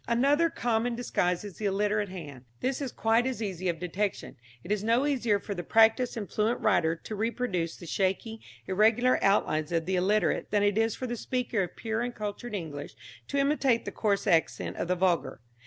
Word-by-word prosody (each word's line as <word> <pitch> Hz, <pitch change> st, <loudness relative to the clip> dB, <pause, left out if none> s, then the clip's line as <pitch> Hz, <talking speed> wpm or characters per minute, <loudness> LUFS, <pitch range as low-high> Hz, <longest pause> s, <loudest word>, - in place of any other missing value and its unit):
Another 280 Hz, +8 st, +3 dB
common 235 Hz, -3 st, 0 dB
disguise 180 Hz, -7 st, 0 dB
is 205 Hz, -4 st, -9 dB
the 215 Hz, -, -4 dB
illiterate 205 Hz, +1 st, +1 dB
hand. 145 Hz, -9 st, -9 dB
This 265 Hz, +2 st, -1 dB
is 270 Hz, -3 st, -3 dB
quite 225 Hz, +3 st, +2 dB
as 260 Hz, -3 st, -3 dB
easy 185 Hz, -4 st, -2 dB
of 170 Hz, -, -1 dB
detection. 185 Hz, +4 st, -3 dB, 0.3 s
It 185 Hz, -, -6 dB
is 210 Hz, -1 st, 0 dB
no 230 Hz, +5 st, +2 dB
easier 235 Hz, -8 st, +1 dB
for 200 Hz, -, -5 dB
the 175 Hz, -, -4 dB
practised 225 Hz, +5 st, +3 dB
and 205 Hz, -3 st, -4 dB
fluent 220 Hz, +5 st, 0 dB
writer 170 Hz, -6 st, +2 dB
to 215 Hz, +6 st, -7 dB
reproduce 210 Hz, -6 st, -1 dB
the 175 Hz, -, -11 dB
shaky, 195 Hz, +6 st, -1 dB, 0.2 s
irregular 220 Hz, +6 st, +3 dB
outlines 155 Hz, -6 st, +2 dB
of 165 Hz, -1 st, 0 dB
the 185 Hz, +1 st, 0 dB
illiterate, 205 Hz, +4 st, +1 dB
than 205 Hz, -1 st, +2 dB
it 205 Hz, -1 st, +2 dB
is 225 Hz, 0 st, +1 dB
for 255 Hz, -, -5 dB
the 240 Hz, -1 st, -3 dB
speaker 245 Hz, -2 st, -1 dB
of 180 Hz, -, -4 dB
pure 225 Hz, 0 st, -2 dB
and 245 Hz, 0 st, -3 dB
cultured 210 Hz, +2 st, -5 dB
English 150 Hz, -6 st, -6 dB, 0.3 s
to 280 Hz, -, -2 dB
imitate 275 Hz, -4 st, +2 dB
the -, -, -4 dB
coarse 205 Hz, -3 st, 0 dB
accent 165 Hz, -1 st, +1 dB
of -, -, -2 dB
the 180 Hz, -, +1 dB
vulgar. 180 Hz, -6 st, 0 dB
210 Hz, 200 wpm, -28 LUFS, 185-235 Hz, 0.3 s, Another